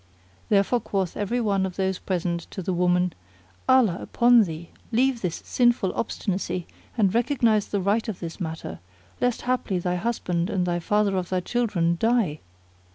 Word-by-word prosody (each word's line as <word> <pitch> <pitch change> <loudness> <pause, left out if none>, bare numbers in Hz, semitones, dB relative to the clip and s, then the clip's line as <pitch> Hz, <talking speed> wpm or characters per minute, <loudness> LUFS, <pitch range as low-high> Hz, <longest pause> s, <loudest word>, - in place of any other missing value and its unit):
Therefore 205 +4 +3
quoth 195 -5 -2
every 210 +4 -1
one 200 -4 +1
of 190 -2 -3
those 190 -1 -1
present 170 -2 -2
to 190 - -6
the 185 - -1
woman, 180 0 +2 0.6
"Allah 240 -9 +4
upon 240 -2 +4
thee, 165 0 -7 0.2
leave 250 +1 +2
this 175 -3 -3
sinful 240 -6 +2
obstinacy 190 -5 -2 0.3
and 200 -4 +3
recognise 235 -3 +2
the 200 - -1
right 205 +5 +1
of 205 - -5
this 170 +1 -7
matter, 160 - -5 0.4
lest 245 -1 0
haply 250 -6 0
thy 180 0 -1
husband 180 -4 -1
and 185 -4 0
the 175 -1 -1
father 205 +2 +1
of 180 -1 -3
thy 185 - +1
children 180 -6 0
die." 225 -10 +1
195 Hz, 160 wpm, -25 LUFS, 180-230 Hz, 0.6 s, Allah